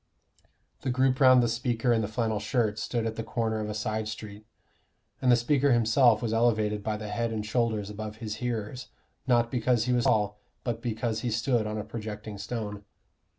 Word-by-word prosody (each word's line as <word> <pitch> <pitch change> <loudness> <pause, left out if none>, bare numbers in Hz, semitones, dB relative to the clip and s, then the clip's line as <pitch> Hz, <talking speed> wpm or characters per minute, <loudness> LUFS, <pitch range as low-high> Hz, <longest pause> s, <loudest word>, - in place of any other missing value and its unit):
The - - -2
group 130 +1 +2
round 130 -2 +7
the - - +2
speaker 120 +1 0
in 115 - +2
the 105 - -1
flannel 110 -1 -1
shirt 110 -1 0
stood 115 0 -2
at 115 0 -3
the 115 - -2
corner 115 -1 -1
of 105 0 -3
a 105 - -4
side 110 0 -2
street, 110 -1 -8 0.7
and 125 - +4
the - - +7
speaker 135 +3 +2
himself 120 0 +4
was 115 -1 -1
elevated 110 -2 +2
by 105 0 -1
the 105 -1 -6
head 115 +2 -1
and 110 -1 -3
shoulders 110 -2 0
above 105 0 -6
his 110 -1 -5
hearers, 120 0 -4 0.4
not 120 -2 +3
because 120 -2 +1
he 125 - +1
was 120 -1 +2
tall, 105 -1 +2 0.2
but 115 -2 -3
because 115 -1 -2
he 120 - -2
stood 115 0 +1
on 105 0 -3
a 105 - -3
projecting 105 -1 -7
stone. 105 -1 -5
110 Hz, 195 wpm, -28 LUFS, 105-120 Hz, 0.7 s, round